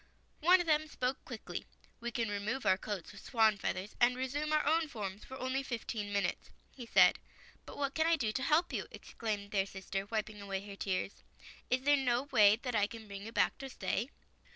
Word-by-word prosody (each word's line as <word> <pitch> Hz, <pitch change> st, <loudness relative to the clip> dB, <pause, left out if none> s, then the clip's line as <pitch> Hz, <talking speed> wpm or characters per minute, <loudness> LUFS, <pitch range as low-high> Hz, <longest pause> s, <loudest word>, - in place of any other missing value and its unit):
One 360 Hz, +4 st, +6 dB
of 350 Hz, -, 0 dB
them 310 Hz, -1 st, +2 dB
spoke 255 Hz, -3 st, -2 dB
quickly. -, -, -6 dB, 0.3 s
"We 235 Hz, -, -3 dB
can 230 Hz, -1 st, -1 dB
remove 205 Hz, +6 st, -2 dB
our 190 Hz, -, +5 dB
coats 200 Hz, -1 st, -5 dB
of 195 Hz, -, -11 dB
swan's 220 Hz, -3 st, +3 dB
feathers 190 Hz, +3 st, -3 dB
and 245 Hz, +1 st, +5 dB
resume 285 Hz, +4 st, -2 dB
our 305 Hz, 0 st, +3 dB
own 320 Hz, +2 st, +3 dB
forms 205 Hz, -6 st, -5 dB
for 260 Hz, -, -9 dB
only 260 Hz, +1 st, -1 dB
fifteen 225 Hz, -5 st, -4 dB
min 200 Hz, 0 st, +1 dB
utes," 175 Hz, -, -3 dB, 0.2 s
he 245 Hz, -3 st, -9 dB
said. -, -, +6 dB, 0.2 s
" -, -, -25 dB
But -, -, -9 dB
what 280 Hz, -1 st, -1 dB
can 320 Hz, 0 st, +2 dB
I 335 Hz, -, +5 dB
do 230 Hz, -8 st, -1 dB
to 260 Hz, -, -2 dB
help 320 Hz, +5 st, +2 dB
you," -, -, -2 dB
ex -, -, -12 dB
claimed 210 Hz, -2 st, -3 dB
their 195 Hz, -1 st, +1 dB
sister, 195 Hz, 0 st, -4 dB
wiping 215 Hz, -1 st, -3 dB
away 195 Hz, 0 st, -4 dB
her 200 Hz, -, -7 dB
tears. 195 Hz, 0 st, -2 dB, 0.2 s
" -, -, -18 dB
Is 255 Hz, +1 st, +1 dB
there 290 Hz, +1 st, +5 dB
no 250 Hz, -2 st, +1 dB
way 215 Hz, -7 st, +6 dB
that 250 Hz, -2 st, -2 dB
I 205 Hz, -2 st, +3 dB
can 225 Hz, 0 st, -9 dB
bring 200 Hz, -1 st, -7 dB
you -, -, -7 dB
back -, -, +1 dB
to 270 Hz, 0 st, -6 dB
stay? 245 Hz, -1 st, -2 dB
230 Hz, 225 wpm, -33 LUFS, 205-270 Hz, 0.3 s, One